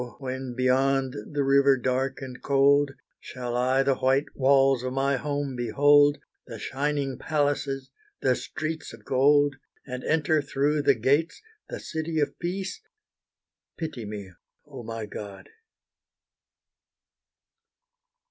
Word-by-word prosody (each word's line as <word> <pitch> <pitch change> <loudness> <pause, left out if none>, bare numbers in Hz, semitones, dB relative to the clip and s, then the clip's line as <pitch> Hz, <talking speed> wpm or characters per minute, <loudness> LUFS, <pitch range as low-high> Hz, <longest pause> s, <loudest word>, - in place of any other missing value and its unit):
when 130 -2 -5
beyond 130 +1 +2 0.2
the 145 -1 0
river 140 0 +4
dark 130 +2 -1
and 130 -1 -8
cold, 140 +1 +4 0.3
Shall 125 -1 -6
I 130 +2 +2
the 135 -1 +1
white 135 +2 +1
walls 135 -1 +4
of 130 0 -3
my 135 +1 +1
home 145 0 -3
behold, 145 +5 +4 0.3
The 115 - -7
shining 140 +2 -2
palaces 145 -3 -1 0.3
the 130 -1 +2
streets 160 +1 -5
of 110 -2 -14
gold, 145 +1 +3 0.3
And 125 -1 -6
enter 155 0 +2
through 145 +2 0
the 140 -1 +4
gates 140 - +1 0.3
the - - -5
City 160 0 -3
of 145 - -1
Peace, 190 - -4 1.0
Pity 135 -9 -5
me, 100 -2 -7 0.3
oh 135 -4 -9
my 115 -1 -5
God! 100 -1 -9
135 Hz, 120 wpm, -26 LUFS, 130-145 Hz, 1.0 s, river